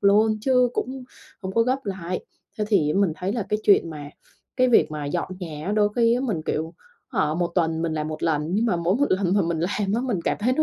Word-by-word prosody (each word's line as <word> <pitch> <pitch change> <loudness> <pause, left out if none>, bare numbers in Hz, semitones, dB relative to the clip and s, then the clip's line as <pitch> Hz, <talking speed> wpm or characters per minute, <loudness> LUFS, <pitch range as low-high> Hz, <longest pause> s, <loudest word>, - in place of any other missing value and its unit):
luôn, 215 +2 +4
chứ 250 0 +3
cũng 260 0 -3 0.4
không 190 0 -4
có 230 - +4
gấp 260 +2 -1
lại. 185 -2 -4 0.3
Thế 210 - +1
thì 155 -9 +3
á 195 - +1
mình 190 -6 +2
thấy 190 +5 -2
là 225 -5 -3
cái 210 - 0
chuyện 195 -5 +4
mà, 145 -2 -7 0.5
cái 255 -1 +4
việc 230 - +4
mà 150 -1 -4
dọn 175 +5 -2
nhà 160 +2 -4
đôi 205 -1 +4
khi 230 0 +4
á 250 - 0
mình, 205 -12 -2
kiểu, 160 +2 -2 0.3
hả 155 - 0
1 175 0 0
tuần 165 -2 +1
mình 165 -1 -1
làm 155 0 -2
1 155 0 -6
lần, 155 -1 0
nhưng 225 +3 +2
mà 185 -6 +1
mỗi 170 +5 +1
một 285 +1 +2
lần 185 0 +2
mà 205 - +4
mình 165 -1 -1
làm 195 +2 -1
á 235 - +1
mình 225 -9 -1
cảm - - 0
thấy 250 +4 +2
nó 310 - +2
195 Hz, 260 wpm, -24 LUFS, 165-230 Hz, 0.5 s, luôn